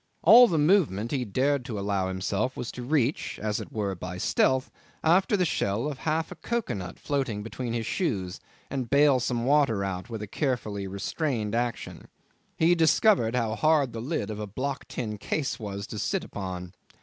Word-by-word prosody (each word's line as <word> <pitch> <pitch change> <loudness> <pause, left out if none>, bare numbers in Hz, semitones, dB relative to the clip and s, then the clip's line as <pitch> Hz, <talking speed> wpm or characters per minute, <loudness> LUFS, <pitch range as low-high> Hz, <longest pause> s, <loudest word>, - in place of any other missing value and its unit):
All 235 +7 +9
the 170 - 0
movement 145 - +2
he 135 -3 0
dared 135 +5 +1
to 115 -4 -4
allow 100 -1 -1
himself 100 +6 -2
was 120 - -4
to 125 - -8
reach, 135 +1 0
as 105 0 -2
it - - -9
were 100 -3 -2
by 90 0 -6
stealth, 130 +7 +1 0.3
after 185 +5 +4
the 180 - +2
shell 110 - 0
of 140 -3 -5
half 160 +1 -1
a - - -6
cocoa 235 +8 -2
nut 90 -2 -6
floating 130 -8 -2
between 115 +1 -4
his 115 -1 -2
shoes, 100 - -2 0.3
and 130 -4 -3
bale 140 -1 +5
some 120 0 -1
of 115 - -2
the 130 - 0
water 140 -9 +3
out 95 +3 -4
with 110 -2 -5
a - - -6
carefully 105 -6 -2
restrained 105 - -2
action. 120 0 -3 0.5
He 165 +2 +4
discovered 160 - +3
how 115 -3 0
hard 150 -1 +2
the 115 - -4
lid 140 -2 -2
of 105 - -6
a 105 - -4
block 130 +6 -4
tin 105 -4 -4
case 135 +6 -2
was 100 -2 -5
to 105 - -6
sit - - -1
upon. 90 -2 -6
120 Hz, 195 wpm, -27 LUFS, 105-145 Hz, 0.5 s, All